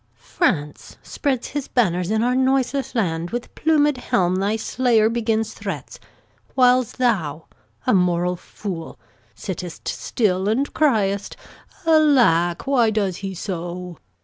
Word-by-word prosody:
France 150 - -2
spreads 265 -5 -2
his 285 -1 -4
banners 180 -7 +1
in 220 +1 +1
our 250 +1 +2
noiseless 265 +1 0
land, 170 -6 -1
With 240 +3 -5
plumed 295 -3 +2
helm 185 -7 +1
thy 200 +3 0
state 225 -1 +2
begins 225 -1 -1
to - - -17
threat, - - -6 0.6
Whiles 250 -2 +4
thou, 170 - 0 0.4
a - - +3
moral 180 -1 +2
fool, 175 -2 -7 0.4
sit'st - - -6
still, 195 -4 0
and 265 +6 0
criest 205 -9 +1 0.5
'Alack, 255 - +4
why 255 -5 +3
does 200 -4 -1
he 195 -1 -5
so?' 175 -2 -5
220 Hz, 125 wpm, -22 LUFS, 180-255 Hz, 0.6 s, Whiles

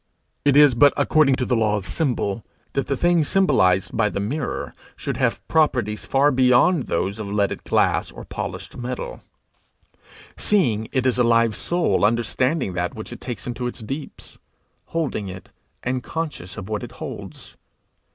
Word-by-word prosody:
It 140 -1 +4
is 145 -3 +7
but 140 +4 +5
according 150 -4 +4
to 130 - -2
the 125 - +1
law 110 -2 +2
of 95 - -6
symbol, 115 -9 -1 0.3
that 135 - -1
the 140 - -1
thing 175 0 +3
symbolized 100 - +2
by 110 -2 +2
the 100 - -3
mirror 125 +7 -3 0.2
should - - -4
have - - -1
properties 120 -9 +1
far 140 +2 +3
beyond 130 +5 +4
those 100 +5 -1
of 105 - -4
leaded 100 0 -1
glass - - +1
or - - -10
polished - - -6
metal, 125 +1 -5 1.1
seeing 120 - +1
it 130 -1 0
is 125 -1 +2
a - - +5
live 115 -2 +3
soul 175 - 0
understanding 120 - +1
that 90 0 -2
which 110 +2 -7
it 120 - -11
takes 120 -6 -6
into 125 0 -3
its 125 - -7
deeps 135 +6 -8 0.5
holding 150 -11 -2
it, 95 0 -9 0.3
and 125 +1 -1
conscious 145 - -5
of 95 - -6
what 105 -1 -2
it - - -8
holds. - - -9
125 Hz, 165 wpm, -22 LUFS, 105-140 Hz, 1.1 s, is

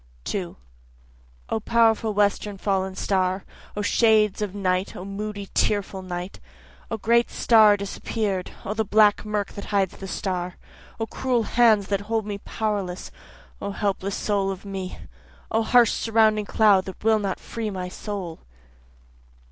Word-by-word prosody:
2 180 - -4 0.9
O - - 0
powerful 225 0 +3
western 205 0 +1
fallen 190 -1 -1
star! 185 -1 0 0.3
O 205 - -1
shades 215 -1 +3
of 205 -2 -3
night 185 -1 -1
O 180 - -7
moody, 200 0 -5
tearful 200 -2 0
night! 180 0 -6 0.5
O 225 - -2
great 235 +2 +3
star 215 -3 +5
disappear'd 200 -1 -3 0.2
O 205 - -2
the 220 +1 0
black 210 0 +4
murk 210 -1 -2
that 200 - -8
hides 195 -3 0
the 195 - -7
star! 180 -1 -3 0.4
O 225 - 0
cruel 245 +1 0
hands 220 -3 +4
that 200 -1 0
hold 220 +1 -1
me 205 -1 -4
powerless 200 -5 -3 0.5
O 200 - -3
helpless 200 -1 -2
soul 200 -2 0
of 195 +1 -6
me! 190 -2 -5 0.5
O 225 - +2
harsh 235 0 +5
surrounding 220 -2 +2
cloud 200 -3 +4
that 190 - -9
will 220 0 +4
not 195 -2 -2
free 225 -2 -4
my 185 -2 -4
soul. 185 -3 -6
205 Hz, 150 wpm, -24 LUFS, 190-220 Hz, 0.9 s, star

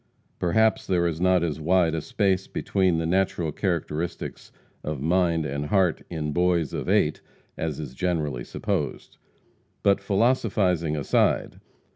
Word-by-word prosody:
Perhaps 110 +6 +2
there 90 -2 +2
is 85 -1 -2
not 90 -1 +3
as 80 -2 -2
wide 85 0 +3
a 80 - -1
space 95 +2 0
between 95 -4 +1
the 80 - -1
natural 90 -2 0
characteristics 85 -1 -3 0.3
of 75 -2 -3
mind 85 +1 +1
and 70 +1 -3
heart 95 -2 +2
in 75 -3 -3
boys 85 -4 +1
of - - -3
eight - - +2 0.3
as 80 -3 -3
is 70 -5 -6
generally 75 -6 -1
supposed. - - -3 0.7
But 100 0 +4
philosophizing 95 -7 +1
aside. 70 - +1
85 Hz, 135 wpm, -25 LUFS, 80-95 Hz, 0.7 s, But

